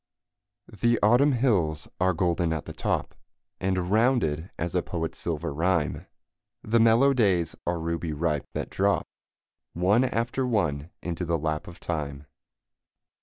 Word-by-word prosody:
The 120 +3 +1
Autumn 125 +7 +5
hills 95 - +1
are 95 +1 +3
golden 85 -1 0
at 80 - -4
the - - -7
top, - - -2 0.5
And 95 -1 -1
rounded 105 - +2
as 85 +1 -3
a 90 - +2
poet's 80 -2 -4
silver 85 -2 -3
rhyme; 80 -3 0 0.6
The 115 +2 +2
mellow 115 +5 +5
days 95 - +2
are 85 0 +1
ruby 85 0 -2
ripe, 75 -1 -1
that - - -4
drop - - +1 0.7
One 95 +8 +3
after 125 +1 -1
one 80 -10 0
into 85 0 -3
the 85 -1 0
lap 75 0 -2
of 85 0 -11
time. 75 -4 -4
90 Hz, 140 wpm, -26 LUFS, 80-110 Hz, 0.7 s, Autumn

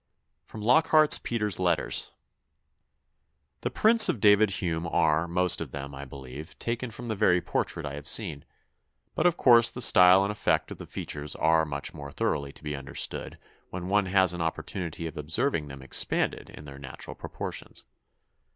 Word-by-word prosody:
'" - - -52
[Sidenote: 105 -1 -9
Lockhart's 155 +4 +5
Peter's 105 -5 -1
Letters.] 90 -4 0 1.5
"The - - -2
prints 220 0 +6
of 115 - -1
David 105 +1 +5
Hume 85 -3 -3
are, 80 0 +1
most 90 +1 +1
of - - -5
them, 70 0 -8
I 70 0 -8
believe, 70 +4 -10
taken 120 +1 -3
from 120 +2 -8
the 110 - -2
very 95 -3 +3
portrait 85 -1 -3
I 70 - -5
have 75 +1 -9
seen; 80 -10 -1 0.7
but 165 - +2
of 175 - 0
course 120 -2 +5
the - - -9
style 95 -5 +6
and 100 - -1
effect 105 - -1
of - - -9
the - - -9
features 75 0 -5
are 80 0 +2
much 70 -1 -6
more 70 -1 -9
thoroughly 70 0 -2
to - - -15
be 75 -1 -4
understood 70 -1 -5 0.3
when 90 0 -6
one 100 -1 +1
has 95 -1 +3
an 90 - -5
opportunity 85 +1 -4
of 80 - -7
observing 80 - -1
them 70 -1 -10
expanded 65 - 0
in 75 - -12
their 70 -1 -11
natural 65 -2 -8
proportions. - - -7
90 Hz, 175 wpm, -27 LUFS, 75-105 Hz, 1.5 s, prints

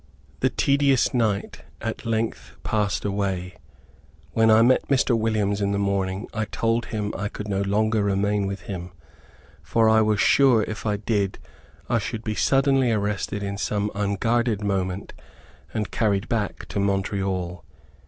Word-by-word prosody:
The 130 - +2
tedious 140 0 +2
night 110 -5 -1 0.2
at - - -5
length 115 0 -2
passed 105 -2 -1
away. 95 -3 -2 0.7
When 115 0 +3
I 110 +1 +6
met 130 +2 +3
Mr. 130 -3 +3
Williams 105 -2 0
in 100 0 +1
the - - 0
morning, 100 0 -1
I 110 0 -1
told 115 +2 0
him 105 -2 -3
I 105 - -2
could 105 0 -7
no 100 -1 -1
longer 110 +2 +1
remain 100 0 +1
with 100 0 -5
him, 90 -2 -7 0.7
for 110 +8 +2
I 110 0 +5
was 105 -1 +2
sure 130 -5 +5
if 110 +1 -5
I 105 -1 +1
did, 100 -2 -1 0.5
I 120 - +2
should 110 +1 -5
be 110 - -2
suddenly 135 +1 +3
arrested 105 -1 -1
in 100 0 -4
some 105 0 -1
unguarded 105 +2 0
moment, 95 -1 -2 0.6
and 105 -3 -3
carried 105 -2 0
back 110 -3 -2
to - - -2
Montreal. 95 -3 -1
105 Hz, 155 wpm, -24 LUFS, 100-115 Hz, 0.7 s, I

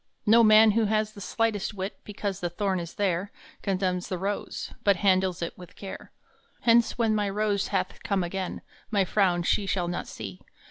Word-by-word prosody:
No 230 +2 +6
man 215 0 +7
who 225 +1 +2
has 215 0 0
the 200 - -11
slightest 215 +2 -1
wit 190 +1 -5
Because 200 -2 -4
the 175 - -2
thorn 190 +1 -1
is 170 -1 -7
there 195 -1 0 0.3
Condemns 185 -2 -1
the 185 - -2
rose, 200 +3 -4
but 200 -1 +4
handles 185 -1 +2
it 170 - -4
With 180 -1 -12
care. 195 -1 -9 0.5
Hence 235 0 +4
when 225 -2 +2
my 210 -1 +1
rose 205 0 0
hath - - -2
come 200 -5 0
again 185 +1 -4 0.3
My 200 -3 +2
frown 180 -3 +2
she 200 +3 +1
shall 180 -2 0
not 175 - -3
see. 95 -4 -8
195 Hz, 185 wpm, -27 LUFS, 180-215 Hz, 0.5 s, man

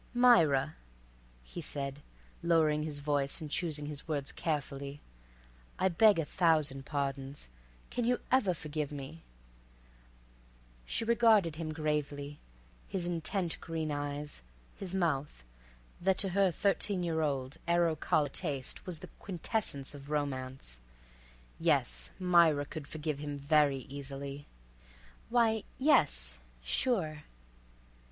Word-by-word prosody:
"Myra," 160 - +5 0.7
he 170 - -7
said, 140 -2 -4 0.4
lowering 160 -3 +3
his 150 -1 -4
voice 145 -1 0
and 155 -3 -7
choosing 155 -4 0
his 145 +1 -3
words 145 -3 -1
carefully, 140 -2 -3 0.8
"I 190 - +3
beg 205 +3 +5
a 165 - 0
thousand 150 -5 +2
pardons. 140 - -3 0.4
Can 245 -1 -1
you 245 +1 +2
ever 220 -9 +3
forgive 150 -2 -4
me?" 145 +3 -7 1.7
She 225 - 0
regarded 220 -8 +4
him 160 -1 -3
gravely, 150 -2 -2 0.5
his 185 -3 -2
intent 175 +1 -2
green 160 -2 -3
eyes, 145 0 -4 0.3
his 190 -1 -5
mouth, 150 - -1 0.6
that 190 +1 +3
to 195 - +3
her 195 +1 +3
thirteen 195 +1 +2
year 165 -2 0
old, 140 -1 -1
arrow 170 -1 +3
collar 150 -1 +1
taste 140 -2 -4
was 180 -3 -2
the - - -10
quintessence 180 - -2
of 140 0 -10
romance. 130 - -3 0.8
Yes, - - +3
Myra 170 -5 +4
could 150 -1 -7
forgive 150 -1 -3
him 145 -1 -4
very 140 -1 +3
easily. 140 +1 -7 0.8
"Why—yes—sure." 155 - +1
150 Hz, 115 wpm, -32 LUFS, 140-175 Hz, 1.7 s, Myra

